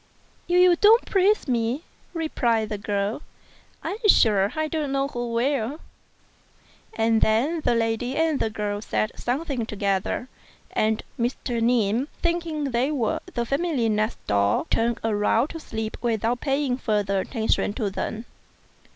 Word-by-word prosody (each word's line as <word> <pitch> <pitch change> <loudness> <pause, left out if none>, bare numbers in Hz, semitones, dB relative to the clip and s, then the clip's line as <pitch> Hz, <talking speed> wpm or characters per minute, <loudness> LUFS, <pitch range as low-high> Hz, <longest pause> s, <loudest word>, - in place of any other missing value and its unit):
"If 355 +1 +3
you 360 -1 +6
don't 445 +5 +6
praise 395 0 +2
me," 240 +4 0 0.3
replied 235 -9 0
the 210 -2 -4
girl, 205 +4 -2 0.6
"I'm 415 - -3
sure 205 - +5
I 310 0 0
don't 305 -3 -2
know 275 0 0
who 240 -2 -4
will;" 260 +3 0 1.2
and 225 0 +2
then 270 +10 +2
the 240 - +2
lady 230 +3 -1
and 320 -2 +2
the 220 - 0
girl 205 -1 -3
said 215 0 -1
something 265 0 -2
together, 200 +2 -1 0.4
and 215 0 0 0.2
Mr. 240 0 -1
Ning, 230 +1 +2
thinking 330 -5 -1
they 245 +4 +1
were 255 -8 0 0.2
the 235 - 0
family 275 -3 0
next 215 +1 0
door, 100 0 +2
turned 230 +1 +1
round 225 +4 +1
to 330 - -7
sleep 220 -6 -5
without 235 +1 0
paying 275 -2 0
further 205 -5 0
attention 220 0 0
to 210 -4 -2
them. 220 +4 -4
235 Hz, 140 wpm, -24 LUFS, 220-290 Hz, 1.2 s, you